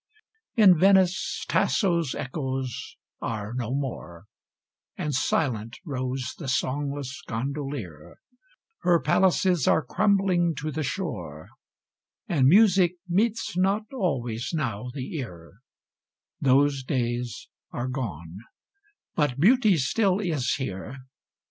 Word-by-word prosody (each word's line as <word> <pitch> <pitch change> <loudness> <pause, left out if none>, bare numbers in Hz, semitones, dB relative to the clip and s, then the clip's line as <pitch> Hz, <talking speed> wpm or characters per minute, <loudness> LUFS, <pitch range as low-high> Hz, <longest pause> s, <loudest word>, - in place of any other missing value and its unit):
In 195 -8 +6
Venice, 190 +1 +3
Tasso's 170 - +1
echoes 130 -3 -4 0.2
are 110 0 -4
no 120 -2 -3
more, 125 -10 -4 0.7
And 150 - -2
silent 120 -4 0
rows 130 -3 -3
the 150 - -6
songless 140 +3 -2
gondolier; 125 - -5 0.6
Her 175 -2 +3
palaces 180 0 +2
are 160 - +4
crumbling 185 0 +2
to 155 +1 -4
the 155 +2 -3
shore, 120 - -5 0.8
And 135 -6 +3
music 185 0 +5
meets 210 +2 0
not 195 +4 +2
always 125 - -2
now 125 -6 -2
the 130 +3 -6
ear: 90 - -8 0.8
Those 140 +1 +3
days 120 -2 -2 0.2
are 120 +1 -3
gone 95 - -5 0.7
but 145 -4 0
Beauty 215 - +5
still 190 - +1
is 155 -10 0
here. 115 -1 -5
140 Hz, 105 wpm, -26 LUFS, 125-175 Hz, 0.8 s, In